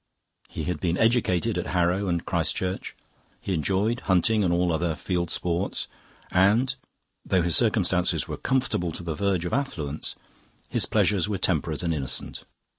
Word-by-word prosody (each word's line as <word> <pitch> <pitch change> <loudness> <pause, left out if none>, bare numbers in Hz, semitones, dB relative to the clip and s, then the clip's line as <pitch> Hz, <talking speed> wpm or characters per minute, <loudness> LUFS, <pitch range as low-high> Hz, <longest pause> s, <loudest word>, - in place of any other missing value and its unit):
He - - -5
had 90 - -2
been 85 -1 0
educated 110 -7 +2
at - - -4
Harrow 90 +3 +2
and 85 -2 -1
Christ 85 -2 0
Church, 95 0 -3 0.4
he 95 - -3
enjoyed 95 +8 0
hunting 105 +3 +2
and 90 - +2
all 85 0 +2
other 80 0 0
field 90 0 -2
sports, 90 +2 -1 0.4
and, 110 +9 +3 0.5
though 90 -2 +2
his 85 -3 +1
circumstances - - +2
were - - -4
comfortable 125 -10 0
to 90 - -7
the 85 -2 -2
verge 95 0 0
of 90 - -3
affluence, 80 - -2 0.5
his - - 0
pleasures 105 -1 +2
were 100 - -1
temperate 80 -4 0
and 85 -1 +1
innocent. 70 -4 -2
90 Hz, 160 wpm, -26 LUFS, 85-100 Hz, 0.5 s, and